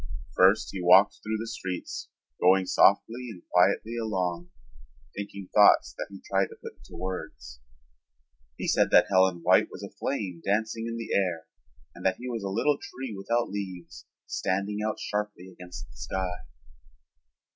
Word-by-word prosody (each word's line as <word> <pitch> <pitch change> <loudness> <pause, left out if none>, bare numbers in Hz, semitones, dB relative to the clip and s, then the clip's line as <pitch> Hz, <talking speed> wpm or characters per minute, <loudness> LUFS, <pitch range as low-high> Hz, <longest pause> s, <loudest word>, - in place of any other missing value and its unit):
First 95 +4 +4
he 95 - -5
walked 95 +3 +6
through 110 +1 -2
the 110 - -4
streets, 95 -6 -5 0.3
going 95 +1 +5
softly 120 +6 +3
and 90 -6 -10
quietly 100 +6 +3
along, 90 -5 -2 0.7
thinking 100 -1 -7
thoughts 105 -1 +6
that - - -5
he 100 -1 -10
tried 95 0 +2
to - - -13
put - - -9
into 75 +4 -13
words. 90 -8 -6 1.0
He - - -4
said - - +3
that - - +6
Helen 95 -2 +3
White - - +5
was - - -10
a - - -7
flame 95 -11 -4
dancing 110 +3 -1
in 115 0 -4
the 115 - -4
air 90 -4 0 0.5
and - - -12
that 95 -1 +2
he 125 - -7
was 115 -3 -3
a 100 - -3
little 140 +9 +1
tree 130 -3 -7
without 115 +4 -1
leaves 95 -4 -7 0.2
standing 100 +3 -2
out 110 0 -2
sharply 105 -3 -4
against 90 -6 -10
the 70 - -19
sky. 90 +7 -3
95 Hz, 160 wpm, -27 LUFS, 90-110 Hz, 1.0 s, walked